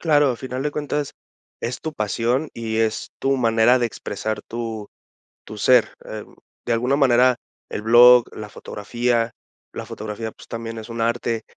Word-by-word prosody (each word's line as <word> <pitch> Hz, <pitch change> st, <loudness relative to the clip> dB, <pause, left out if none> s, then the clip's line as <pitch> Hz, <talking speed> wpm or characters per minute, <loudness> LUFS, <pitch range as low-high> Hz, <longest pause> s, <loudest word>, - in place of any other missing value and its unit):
Claro, 145 Hz, -4 st, +4 dB
a 120 Hz, -, -3 dB
final 130 Hz, +1 st, -5 dB
de 150 Hz, -, -1 dB
cuentas 145 Hz, -1 st, -3 dB, 0.5 s
es 120 Hz, -, -4 dB
tu 160 Hz, -, -4 dB
pasión 120 Hz, +5 st, 0 dB
y 110 Hz, -1 st, -3 dB
es 110 Hz, -1 st, 0 dB
tu 135 Hz, 0 st, +2 dB
manera 115 Hz, +1 st, +4 dB
de 120 Hz, -, +1 dB
expresar 110 Hz, 0 st, -4 dB
tu 115 Hz, -3 st, -5 dB, 0.6 s
tu 105 Hz, -, -10 dB
ser, 125 Hz, +3 st, +4 dB
em, 110 Hz, -1 st, -8 dB, 0.3 s
de 120 Hz, -, +1 dB
alguna 125 Hz, +4 st, +1 dB
manera 125 Hz, -2 st, +5 dB, 0.3 s
el -, -, -4 dB
blog, 120 Hz, +2 st, +8 dB
la 105 Hz, -1 st, -7 dB
fotografía. 120 Hz, +3 st, -1 dB, 0.4 s
La -, -, -6 dB
fotografía, 110 Hz, +1 st, -6 dB
pues, -, -, -16 dB
también 115 Hz, 0 st, -5 dB
es 110 Hz, +1 st, -8 dB
un 115 Hz, 0 st, -6 dB
arte, 115 Hz, -1 st, 0 dB
115 Hz, 165 wpm, -22 LUFS, 110-125 Hz, 0.6 s, blog